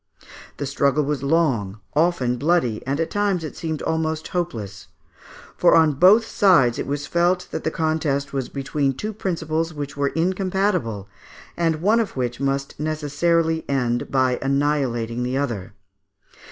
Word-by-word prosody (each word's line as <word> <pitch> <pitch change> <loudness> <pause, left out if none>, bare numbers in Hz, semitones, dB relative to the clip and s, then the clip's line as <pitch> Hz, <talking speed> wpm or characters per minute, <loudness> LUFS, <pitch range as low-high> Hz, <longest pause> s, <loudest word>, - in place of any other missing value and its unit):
The 145 - -3
struggle 140 +2 +1
was 145 -2 -2
long, 135 - +1 0.2
often 150 -7 +2
bloody, 140 -6 +1
and 140 +3 -1
at 165 0 -1
times 200 -4 0
it 155 - -6
seemed 160 -2 -4
almost 160 -1 -2
hopeless, 115 - -4 0.7
for - - +4
on 160 -2 +5
both 190 - +6
sides 170 - +3
it - - -3
was 145 +1 -2
felt 175 +1 +1
that - - -4
the - - +1
contest 155 -3 -1
was 135 -2 -2
between 140 0 -1
two 215 +11 -5
principles 165 -4 -2
which 145 -1 -5
were 140 0 0
incompatible, 180 - -1 0.5
and 165 -1 0
one 215 +4 +4
of 220 -10 -2
which 125 -1 -2
must 140 0 -2
necessarily 160 +2 0
end 120 -3 0
by 130 -2 +1
annihilating 135 -4 0
the 125 +2 -1
other. 115 -8 -3
150 Hz, 150 wpm, -22 LUFS, 135-170 Hz, 0.7 s, both